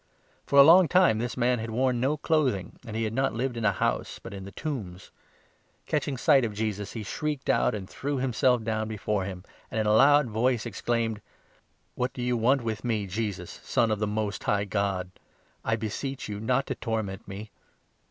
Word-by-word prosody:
For 140 - +2
a 140 - +11
long 170 +4 +8
time 180 -12 +4
this 120 +2 -3
man 125 0 +2
had 115 +1 -4
worn 125 +2 +1
no 135 +5 +1
clothing, 140 - 0
and 110 - -6
he 115 - 0
had 110 0 -2
not 135 -2 0
lived 125 +1 -1
in 115 - -4
a 100 - +5
house, - - -1
but - - -10
in 95 -1 -7
the 100 - -9
tombs. 100 - -6 0.7
Catching 145 -2 -1
sight 140 0 +4
of 110 -3 -2
Jesus, 105 -2 -3
he 110 - -5
shrieked 150 +6 -2
out - - +2
and 95 -3 -6
threw 140 +6 -3
himself 125 -1 +2
28 - - -10
down 110 -1 -1
before 105 -2 -2
him, 90 -2 -6 0.3
and 110 - -2
in 110 - +1
a 105 - +3
loud 145 +5 +6
voice 115 +1 0
exclaimed: 115 0 -1 0.4
" - - -37 0.3
What 125 0 -2
do 125 - -5
you 125 0 +1
want 125 +3 +2
with 110 -2 -3
me, 110 -4 0
Jesus, 95 -2 -4
Son 115 -2 +1
of 105 - 0
the 105 - 0
Most 105 0 -3
High 100 -1 +1
God? 100 -2 -1 0.5
I 115 - +1
beseech 115 +5 -4
you 105 -1 -5
not 125 +5 +1
to - - -2
torment 110 -5 -4
me." 100 +2 -8
115 Hz, 210 wpm, -27 LUFS, 105-130 Hz, 0.7 s, a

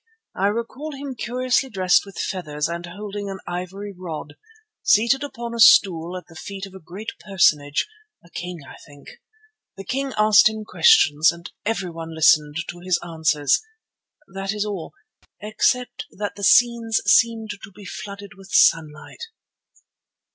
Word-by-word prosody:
I 195 - +1
recall 255 +8 -4
him 275 -1 -6
curiously 255 +2 -1
dressed 185 -2 +2
with 195 - -12
feathers 150 -5 -3
and 170 +1 -5
holding 205 +2 -6
an 195 - -5
ivory 185 +3 -6
rod, 160 -5 -7 0.5
seated 235 +6 +3
upon 235 -4 -6
a 235 - -5
stool 180 -5 +5
at 180 - -10
the 165 - -17
feet 195 +4 -7
of 195 - -13
a 190 - -10
great 195 +7 -8
personage—a 195 - -1
king, 175 -2 -6
I - - -12
think. 145 -1 -15 0.7
The 195 - -7
king 270 +6 -3
asked 215 0 +6
him 220 0 -6
questions, 165 - +5
and 170 0 -11 0.2
everyone 165 -7 -4
listened 150 -1 +4
to 175 - -7
his 180 0 0
answers. 160 -4 +1 0.7
That 195 +1 -3
is 210 0 -2
all, 200 -6 -6 0.4
except 220 +4 -1
that 205 0 -5
the 200 - -9
scenes 230 0 +4
seemed 225 -2 +3
to - - -11
be 200 +2 -14
flooded 200 +1 -8
with 195 0 -15
sunlight." 155 - +2
195 Hz, 145 wpm, -22 LUFS, 170-225 Hz, 0.7 s, asked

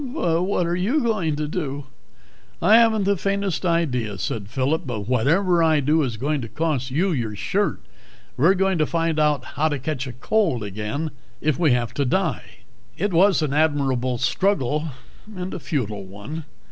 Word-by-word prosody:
"But 175 - 0
what 180 -1 0
are 170 +1 0
you 210 - +1
going 210 - 0
to 150 0 -2
do?" 145 -4 -4 0.7
"I 220 - +6
haven't 225 -3 +4
the 200 +1 +2
faintest 195 -1 -1
idea," 125 - 0
said 100 +2 -4
Phillip, 135 +5 -1
"but 115 -4 -3
whatever 160 - +2
I 160 -2 +4
do 150 +3 +2
is 125 -6 -2
going 145 +4 -1
to 115 - -5
cost 145 -1 -1
you 175 +9 +1
your 115 -8 -2
shirt. - - -1 0.5
We're 170 +9 +4
going 190 -2 +1
to 155 - +2
find 165 -2 0
out 150 -4 +2
how 155 +3 0
to 145 - -1
catch 135 -1 -3
cold 200 - +1
again 105 +10 -4 0.3
if 155 0 0
we 155 -7 +4
have 120 -2 -1
to 140 - 0
die." 145 -7 -2 0.4
It 200 +1 -1
was 185 0 +4
an 145 -2 -1
admirable 135 -5 +1
struggle, 155 - 0 0.5
and 185 0 -5
a - - -4
futile 110 - -3
one. 105 +12 -8
155 Hz, 175 wpm, -23 LUFS, 130-180 Hz, 0.7 s, I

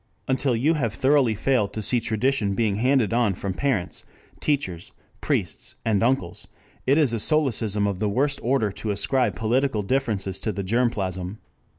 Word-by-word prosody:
Until 130 -1 +1
you 140 +8 +2
have 125 -9 -2
thoroughly 130 -4 +3
failed 120 -2 0
to 110 - -4
see 120 +4 +3
tradition 110 -2 0
being 110 -2 +1
handed 120 0 +2
on 115 -5 +2
from 95 +1 -4
parents, 115 -5 -2 0.4
teachers, 95 - -2 0.3
priests, 85 -7 -2
and 105 -4 +2
uncles, 115 -8 -1 0.4
it 140 +3 +4
is 145 -7 +3
a 115 - -1
solecism 115 -8 +2
of 100 -2 -2
the 105 0 0
worst 140 +7 0
order 120 -4 +1
to 105 - -5
ascribe 105 +2 +1
political 115 +2 0
differences 100 -5 -1
to 110 - -2
the 100 0 -4
germ 120 +6 +2
plasm. 95 -2 -4
115 Hz, 170 wpm, -24 LUFS, 100-130 Hz, 0.4 s, it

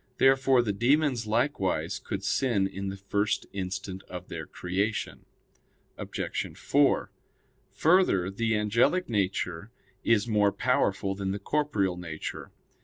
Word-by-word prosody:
Therefore 135 -1 +4
the 105 -3 -1
demons 125 +1 +2
likewise 110 -3 0
could - - -5
sin 120 -8 +1
in 95 0 -4
the 95 - -6
first 100 +2 -1
instant 95 0 -4
of 90 0 -8
their - - -6
creation. 100 +5 -3 0.7
Obj. - - -4
4: - - +2 0.6
Further, 155 - +3
the 110 +2 0
angelic 115 - +2
nature 95 -3 -1 0.3
is 115 -2 +3
more 105 -2 +3
powerful 95 0 +1
than 95 0 -3
the 95 - -1
corporeal 105 -6 0
nature. 80 -3 -6
105 Hz, 120 wpm, -28 LUFS, 95-120 Hz, 0.7 s, Therefore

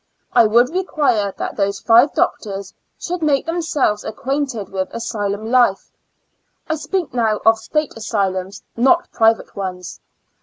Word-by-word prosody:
I 235 -2 +6
would 240 +5 +3
require 290 - 0
that - - -5
those 200 -1 0
^yq 235 +5 +4
doctors 195 -2 -2 0.2
should 355 0 -4
make 290 -3 +1
themselves 320 -10 0
acquainted 270 -2 -3
with 190 -1 -3
asylum 215 -2 -3
life; 240 -6 +2 0.8
I 315 - 0
speak 335 -3 -3
now 225 -3 +1
of 225 0 +5
State 300 +6 -2
asylums, 195 -3 -2
not 340 +9 +2
private 225 0 +2
ones. 180 -3 -6
225 Hz, 130 wpm, -19 LUFS, 200-285 Hz, 0.8 s, I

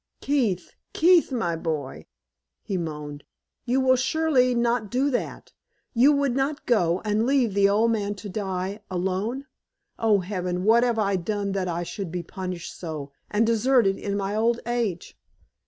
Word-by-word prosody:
"Keith! 235 -11 0 0.2
Keith, 345 -2 +4
my 200 -10 -1
boy!" 150 - -4 0.6
he 195 - -3
moaned. 150 -4 -5 0.4
"You 255 +2 +1
will 260 -1 +4
surely 260 -1 +2
not 235 -2 0
do 265 +5 +1
that? 245 - -4 0.4
You 255 +4 +5
would 280 -3 +1
not 280 +3 -1
go, 180 -7 +2
and 215 +2 +1
leave 260 -6 +2
the 200 0 +4
old 220 +3 +3
man 205 -2 -1
to 205 - -9
die 190 0 -3
alone? 190 +8 -2 0.5
Oh, 215 -3 +3
Heaven! 180 -1 -3
what 225 +3 +5
have 240 -2 +1
I 200 -3 +1
done 200 +2 -2
that 190 -1 -1
I 175 0 -2
should 180 0 -6
be 175 0 -3
punished 180 0 -6
so, 155 -5 -6 0.2
and 210 +2 +2
deserted 230 -3 +3
in 200 0 -2
my 200 +1 -2
old 230 +2 +2
age?" 230 -7 -3
210 Hz, 160 wpm, -25 LUFS, 180-245 Hz, 0.6 s, You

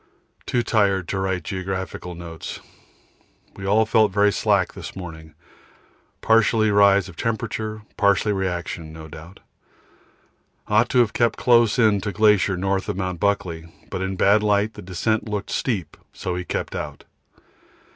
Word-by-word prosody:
Too 120 -1 +1
tired 100 -6 +1
to 95 - -1
write 95 -1 -1
geological 95 -2 -5
notes. 85 -1 -8 1.0
We 95 - -6
all 110 +3 +4
felt 110 -1 +3
very 105 +1 +3
slack - - +1
this - - -8
morning, 80 -4 -9 0.9
partly 110 -1 +3
rise 100 -2 +5
of 90 - -12
temperature, 110 0 -3
partly 100 +1 +3
reaction, 85 -4 -3
no 80 0 -10
doubt. 80 +4 -12 1.3
Ought 110 +3 +3
to - - 0
have 115 -4 0
kept 120 -1 +1
close 120 -3 +4
in 110 -4 +3
to 105 - -3
glacier 105 -3 +3
north 95 +1 -1
of - - -2
Mt. 90 -2 -3
Buckley, 85 -5 -1 0.2
but 95 - -3
in 95 0 -2
bad 100 +3 +4
light 105 +1 +1
the 105 - -10
descent 105 +4 -1
looked 105 -1 -4
steep 95 - -2 0.3
and 90 - -1
we 90 0 -4
kept - - -3
out. 75 -2 -6
100 Hz, 150 wpm, -23 LUFS, 90-105 Hz, 1.3 s, rise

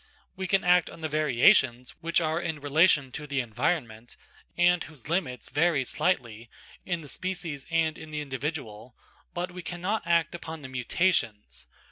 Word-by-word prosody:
We 190 0 -4
can 195 +2 +2
act 180 0 +4
on - - -12
the 160 - -1
variations 130 -4 +3
which 170 +1 +2
are 160 0 0
in 160 -3 -3
relation 145 -1 +3
to 150 +3 -6
the 140 -1 -1
environment, 120 -1 -2 0.4
and 175 0 +4
whose 150 -5 -13
limits 155 -7 -2
vary 150 -2 +2
slightly 120 -9 -1 0.3
in 175 -2 -2
the 150 - -11
species 170 -4 -4
and 165 -1 +1
in 160 - -10
the 150 0 -4
individual, 130 -5 -5 0.4
but 175 +1 -3
we 180 +1 -7
cannot 180 +4 -3
act 170 -1 +2
upon 160 -3 -7
the 130 - -7
mutations. 115 - -1
155 Hz, 160 wpm, -28 LUFS, 130-175 Hz, 0.4 s, act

